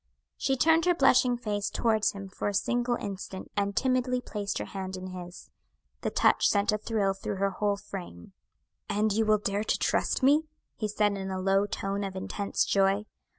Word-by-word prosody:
She 270 -1 0
turned 320 +5 +4
her 355 -1 +4
blushing 255 -4 +4
face 210 -4 -2
towards 220 -2 +1
him 195 -1 -7
for 190 - -4
a 205 - -1
single 240 +4 +1
instant, 195 -3 -6
and 200 -1 0
timidly 255 -1 +1
placed 205 -4 -4
her - - -3
hand 190 -1 -5
in 185 0 -7
his. 180 -1 -9 0.5
The - - -1
touch - - +3
sent 205 +1 +2
a 210 - -1
thrill 210 -3 0
through 195 +1 -4
her 195 +1 0
whole 205 +1 0
frame. 175 - -9 0.6
"And 210 0 +1
you 220 +1 +1
will 215 0 +5
dare 205 0 -1
trust 240 - 0
me?" 295 +4 +4 0.3
he 215 - -2
said 210 -1 +1
in 190 -1 -4
a 190 0 -3
low 195 +2 +2
tone 200 0 -3
of 195 -1 -5
intense 200 +1 -1
joy. 195 +1 +2
205 Hz, 190 wpm, -28 LUFS, 195-230 Hz, 0.6 s, will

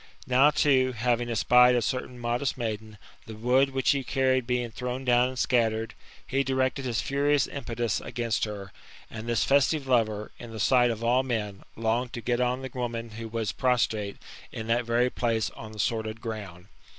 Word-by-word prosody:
Ndw 130 +4 +5
tooj 130 -3 +3
having 120 +1 0
espied 125 +2 +5
a - - +3
certain 125 -1 -3
modest 120 +3 -1
maiden^ 110 -2 -4 0.3
Ib^ 110 -1 -9
wood 130 +4 +3
which 135 -1 +2
he 140 -1 0
carried 130 -1 +1
being 125 -2 -1
thrown 125 +3 -4
down 125 0 +4
and 130 - -8
scattered/ 115 -3 +1 0.3
he 135 +1 0
directed 130 0 0
his 120 -3 0
furious 140 0 +2
impetus 120 -5 -3
against 115 -2 -1
her; 100 -3 -7 0.4
and 115 +1 -6
this 115 -1 +2
festive 140 +1 +2
lover, 110 -5 +1
in 120 - -9
the 110 -1 -8
sight 125 +1 +4
of 115 -1 -3
all 120 +2 +3
men, 110 -6 -3
longed 115 +2 -1
to 120 - -5
get 120 +2 0
on 125 +1 0
the 130 - -6
woman 115 -2 -4
whoi 115 +1 -7
was 115 -3 -1
prostrate, 110 -5 0 0.3
in 110 - -6
that 115 +1 +1
very 120 +2 +2
place, 115 -3 0
on 110 -1 -10
the 110 - -11
sordid 110 +1 -2
ground. 100 -6 -7
120 Hz, 185 wpm, -27 LUFS, 110-130 Hz, 0.4 s, Ndw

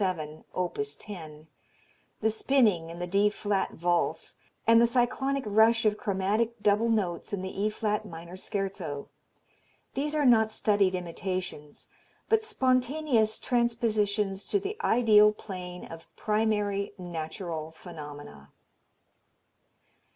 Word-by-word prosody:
7, 155 -5 -2
opus 425 - -2
10, 155 -7 -9 0.8
the 220 0 +2
spinning 215 -8 +2
in 170 - -8
the 175 - -3
D 200 +3 +3
flat 205 -1 -1
Valse 175 +1 0 0.3
and 230 0 +6
the 235 - +5
cyclonic 265 +3 0
rush 220 +2 +4
of 210 -1 +4
chromatic 210 +2 0
double 210 +3 +3
notes 195 -5 -1
in 190 -2 -2
the 190 +1 -4
E 210 - +2
flat 210 0 -1
minor 170 -2 -9
Scherzo 190 -7 -4 0.8
these 295 +3 -2
are 295 -2 +2
not 220 -3 +5
studied 205 -3 +2
imitations 180 -3 -5 0.4
but 445 0 +3
spontaneous 255 - +1
transpositions 215 -5 0
to 405 - +1
the 400 +2 -4
ideal 215 -3 +6
plane 180 -4 -8
of 165 0 -11
primary, 210 -2 0
natural 165 -2 -5
phenomena. 145 - -10
205 Hz, 120 wpm, -28 LUFS, 180-230 Hz, 0.8 s, and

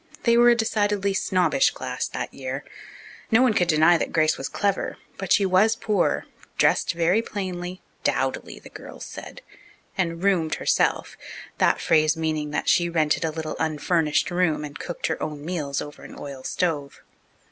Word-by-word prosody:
They 235 -1 +4
were 240 +1 +6
a 240 - +6
decidedly 205 -3 0
snobbish 195 +8 +2
class - - -4
that - - -5
year. - - -5 0.7
No 225 +2 +5
one 250 -4 +4
could 180 -4 +2
deny 160 +1 +5
that - - -2
Grace 155 -1 +3
was 135 - -5
clever, 200 -1 -1 0.2
but 195 -2 -5
she 200 - +5
was 195 +4 +4
poor, 215 -2 0 0.3
dressed - - +3
very 175 +6 +2
plainly 185 -4 -5 0.2
"dowdily," - - -1
the - - -14
girls - - -10
said - - -10 0.5
and 170 -2 -2
"roomed" 180 -6 +2
herself, - - 0 0.4
that - - +3
phrase 155 +1 +3
meaning 155 -2 -1
that 150 - -3
she 175 -1 +3
rented 155 -2 +1
a 165 - +1
little 155 0 -5
unfurnished 160 0 +1
room 175 -4 +1
and 145 -1 -9
cooked 175 - -5
her 160 - -2
own 150 -1 -5
meals 150 -5 -2
over 145 - -11
an - - -11
oil 140 -2 -8
stove. 150 -5 -2
175 Hz, 170 wpm, -24 LUFS, 155-200 Hz, 0.7 s, were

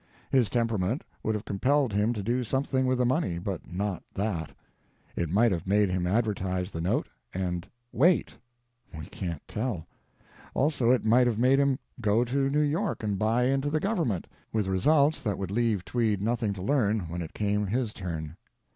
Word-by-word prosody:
His 125 -5 +3
temperament 115 - 0 0.2
would 110 - 0
have 105 +1 -4
compelled 130 +4 +1
him 105 +3 +2
to 105 -4 -4
do 120 +4 0
something 130 +2 0
with 130 0 +2
the 125 - +2
money, 125 - +1
but 90 0 -5
not 95 +1 -2
that. 95 -6 -2 0.6
It 85 - -1
might 110 +6 +4
have 90 0 -2
made 100 0 +3
him 90 -1 0
advertise 95 -3 0
the 80 - -4
note—and 90 0 -3 0.2
WAIT. 170 +8 +3 0.6
We 80 - -6
can't 85 -5 -6
tell. 105 -7 -3 0.7
Also, 140 -4 +2
it 125 -3 +3
might 125 +3 +5
have 115 -3 0
made 130 +4 +4
him 140 -2 +3 0.2
go 110 +2 +3
to 135 +2 +1
New 150 +2 +2
York 160 - -1
and 100 -3 -1
buy 115 +3 +2
into 135 +3 +1
the 155 +1 +1
Government, 165 - 0 0.3
with 110 -2 0
results 140 +11 +3
that 105 -3 -1
would 95 -1 -4
leave 110 -4 +1
Tweed 105 +2 +1
nothing 115 +1 0
to 95 -2 -7
learn 110 -3 +2
when 85 0 -5
it 80 - -7
came 105 0 0
his 115 +1 -1
turn. 80 -3 -5
110 Hz, 180 wpm, -28 LUFS, 95-130 Hz, 0.7 s, might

